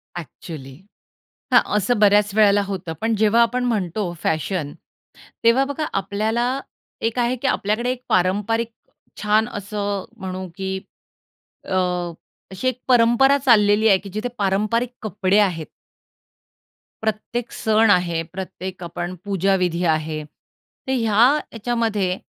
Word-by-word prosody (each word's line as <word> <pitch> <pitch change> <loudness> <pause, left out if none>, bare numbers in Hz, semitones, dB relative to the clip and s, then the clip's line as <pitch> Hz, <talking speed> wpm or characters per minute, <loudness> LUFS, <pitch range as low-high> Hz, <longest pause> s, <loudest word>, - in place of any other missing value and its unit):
Actually. 150 -3 -8 0.8
हां, - - +8 0.2
असं 210 +2 +1
बऱ्याचं 205 0 +4
वेळेला 205 -1 +5
होतं. 185 -4 -4
पण 225 0 +1
जेव्हा 220 +2 +4
आपण 245 +2 +1
म्हणतो 200 -4 -1
फॅशन, 155 -1 -1 0.7
तेव्हा 245 +4 +4
बघा 285 +2 -3
आपल्याला 225 +6 0 0.4
एक 230 +2 -1
आहे 240 +1 +1
की 275 - 0
आपल्याकडे 235 +1 0
एक 255 0 -6
पारंपारिक 205 +5 +1 0.5
छान 215 +2 +3
असं 205 -1 -3
म्हणू 185 -2 -5
की 190 0 -3 0.9
अ, - - -9 0.8
अशी 190 +7 -3
एक 255 -1 -1
परंपरा 250 +3 +5
चाललेली 220 -5 +4
आहे, 195 - +6
की 200 - -10
जिथे 215 +4 -2
पारंपरिक 215 +5 +1
कपडे 205 -1 +1
आहेत. 175 -6 +1 1.4
प्रत्येक 220 +2 -3
सण 220 0 +2
आहे, 175 -3 +2
प्रत्येक 185 -1 -6
आपण 175 +1 -5
पूजाविधी 185 -3 +1
आहे. 155 -1 0
तर 150 - -13
ह्या 235 +1 +4 0.2
याच्यामध्ये 220 -5 -1
210 Hz, 120 wpm, -22 LUFS, 185-230 Hz, 1.4 s, हां